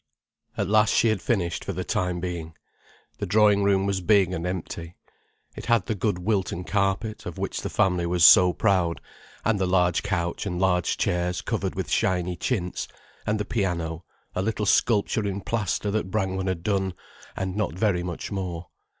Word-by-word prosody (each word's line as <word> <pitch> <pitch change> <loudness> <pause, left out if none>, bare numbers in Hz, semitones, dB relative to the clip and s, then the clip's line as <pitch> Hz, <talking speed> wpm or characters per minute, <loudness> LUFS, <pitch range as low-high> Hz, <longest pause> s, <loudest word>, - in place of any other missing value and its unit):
At 100 - 0
last 105 +1 +4
she 115 - +4
had 110 -4 0
finished 90 -7 -1
for 100 - -4
the 90 +1 -3
time 90 -4 -1
being. 85 -3 -5 0.6
The - - -2
drawing 105 -1 +4
room 100 -1 +3
was 100 -1 -1
big 95 -1 +4
and 85 0 -3
empty. 85 -1 -5 0.6
It - - -8
had 115 -6 +3
the - - -1
good 100 -1 -1
Wilton 95 -2 -1
carpet, 100 +3 -1
of 90 - -7
which - - -3
the - - -4
family 90 -2 +1
was 85 -1 +4
so 90 +1 +8
proud, 90 -4 +1 0.5
and 115 -3 +2
the 95 - +1
large 90 -2 +2
couch 100 -1 -2
and 90 -2 -3
large 90 -2 +1
chairs 90 0 -1
covered - - -2
with - - -4
shiny 90 -1 +1
chintz, 90 -1 -2 0.4
and 105 0 +1
the 105 - -2
piano, 85 -6 -2 0.3
a 90 - -1
little 105 +1 -1
sculpture 105 0 +2
in 100 0 -2
plaster 105 -1 -1
that 105 -2 -1
Brangwen 95 -2 -1
had 90 -3 -2
done, 95 -2 0 0.4
and 95 -1 -3
not 105 -6 -1
very 95 -2 +1
much 90 +2 -5
more. 90 -4 -4
95 Hz, 180 wpm, -25 LUFS, 90-105 Hz, 0.6 s, so